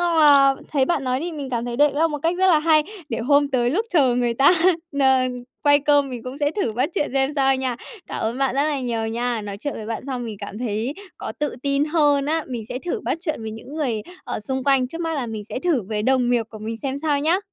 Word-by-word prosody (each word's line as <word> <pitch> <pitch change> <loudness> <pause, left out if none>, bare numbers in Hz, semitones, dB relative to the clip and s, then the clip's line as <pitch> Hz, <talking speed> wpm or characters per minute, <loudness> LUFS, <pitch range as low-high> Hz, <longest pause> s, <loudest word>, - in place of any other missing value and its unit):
mà 295 -5 +5 0.2
thấy 270 -3 +3
bạn 285 -5 0
nói 255 +1 0
thì 345 +1 -4
mình 280 -4 -6
cảm 235 -2 -1
thấy 240 -1 -4
đây 290 +1 +4
là 320 +3 +3
một 295 -1 -3
cách 335 +2 +2
rất 380 - +4
là 330 -4 +5
hay, 310 -1 +4 0.3
để 230 - -2
hôm 285 +4 +3
tới 245 -3 +1
lúc 430 +9 0
chờ 275 -9 +3
người 240 -1 +1
ta 270 +4 +6 0.5
n - - +2 0.6
quay 285 0 +6
cơm 285 -2 +3
mình 245 -2 -6
cũng 255 +2 -7
sẽ 290 -1 +1
thử 320 - -1
bắt 255 +9 0
chuyện 295 - 0
xem 270 +1 +2
sao 270 -1 +3
nha. 260 -2 -2 0.3
Cảm - - -5
ơn 230 +3 -2
bạn 270 -2 +1
rất 280 - +2
là 295 -3 -1
nhiều 230 -3 -2
nha. 235 0 -1
Nói 200 -1 -6
chuyện 290 - -3
với 215 - -7
bạn 225 +2 -4
xong 250 -3 -3
mình 220 -3 -6
cảm 205 +1 -7
thấy 235 +3 -2 0.2
có - - -5
tự 295 -3 -1
tin 280 +1 +1
hơn 295 -3 +2
á, 320 +1 0
mình 240 -3 -4
sẽ 250 - -4
thử 420 +5 -2
bắt 330 - -2
chuyện 310 -10 -3
với 220 - -4
những 225 +6 -9
người, 245 -9 -1 0.2
ở, - - -4
xung 265 +4 -3
quanh, 270 -2 +3
trước 330 +5 -7
mắt 325 -1 -1
là 270 -5 -2
mình 220 -2 -5
sẽ - - -4
thử 305 - +1
với 210 +2 -3
đồng 255 0 +2
nghiệp 240 -2 +3
của 215 - -9
mình 220 +2 -5
xem 270 0 -2
sao 290 -2 +1
nhá. 330 +5 +2
270 Hz, 270 wpm, -22 LUFS, 240-295 Hz, 0.6 s, ta